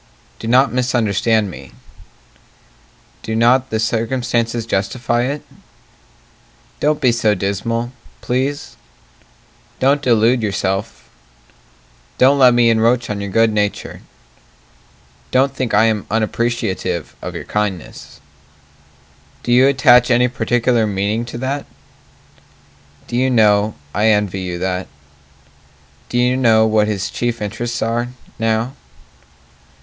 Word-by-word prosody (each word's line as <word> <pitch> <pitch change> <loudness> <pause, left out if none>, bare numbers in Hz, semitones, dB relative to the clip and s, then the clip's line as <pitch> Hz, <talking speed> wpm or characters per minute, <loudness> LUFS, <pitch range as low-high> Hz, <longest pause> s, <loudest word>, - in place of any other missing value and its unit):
Do 115 - -6
not 130 +3 +3
misunderstand 110 -4 +1
me - - -12 1.5
Do 110 - -4
not 125 +3 +3
the 110 - -2
circumstances 115 0 -1
justify 120 +4 -1
it? 145 +3 -4 1.4
Don't 150 0 +1
be 130 -5 +3
so 110 -3 +1
dismal, 115 +5 -2 0.3
please 135 +3 -3 1.0
Don't 140 +2 +2
delude 120 -1 +3
yourself 100 0 -3 1.1
Don't 140 +2 +4
let 125 -2 +6
me 120 -1 +4
encroach 115 +1 +1
on 100 -1 -4
your 100 - -4
good 115 +2 +2
nature 105 -1 -2 1.3
Don't 135 +1 +2
think 130 -3 -2
I 105 - +5
am 110 -2 0
unappreciative 110 -6 -2
of - - -6
your - - -5
kindness 105 -5 -4 1.2
Do 120 - -2
you 125 +2 +6
attach 125 -2 +5
any 125 0 +3
particular 120 -1 0
meaning 105 +3 -1
to 120 - -7
that? 135 +3 -3 1.4
Do - - -6
you 130 +2 +2
know, 105 -3 +3 0.2
I 105 +2 +1
envy 105 -3 +1
you 90 -1 -4
that 90 +1 -3 1.2
Do 120 - -2
you 125 +1 +2
know 115 -4 +4
what 110 -1 +2
his 105 -3 -3
chief 120 -1 -2
interests 115 +3 -3
are 115 +2 -1 0.3
now? 115 +3 0
115 Hz, 115 wpm, -18 LUFS, 105-125 Hz, 1.5 s, let